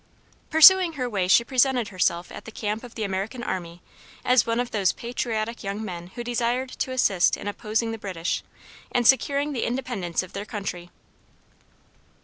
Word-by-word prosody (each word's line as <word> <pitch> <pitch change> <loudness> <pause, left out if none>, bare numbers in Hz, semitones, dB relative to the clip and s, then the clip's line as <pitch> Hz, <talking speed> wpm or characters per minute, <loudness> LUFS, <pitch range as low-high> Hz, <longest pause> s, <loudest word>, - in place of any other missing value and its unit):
Pursuing 345 +2 +8
her 255 -4 -3
way 195 -6 -1
she 215 +5 +5
presented 255 -2 +1
herself 180 -2 0
at - - -9
the 225 - -9
camp 215 +1 -3
of 245 -1 -11
the 220 - -3
American 200 +5 -3
army 175 -5 -5 0.4
as 250 -3 +4
one 230 +1 0
of 245 -1 -2
those 200 -3 +2
patriotic 230 -1 -3
young 200 +2 -4
men 175 -3 -6
who 240 - -5
desired 245 +2 -1
to - - -3
assist 200 -8 +2
in - - -7
opposing 220 +2 -2
the 225 - -6
British, 180 -5 -3 0.5
and 245 -1 +1
securing 280 +3 +3
the 245 - -2
independence 235 -9 -2
of 185 - -12
their 200 - -4
country. 195 -5 -6
225 Hz, 170 wpm, -25 LUFS, 195-245 Hz, 0.5 s, Pursuing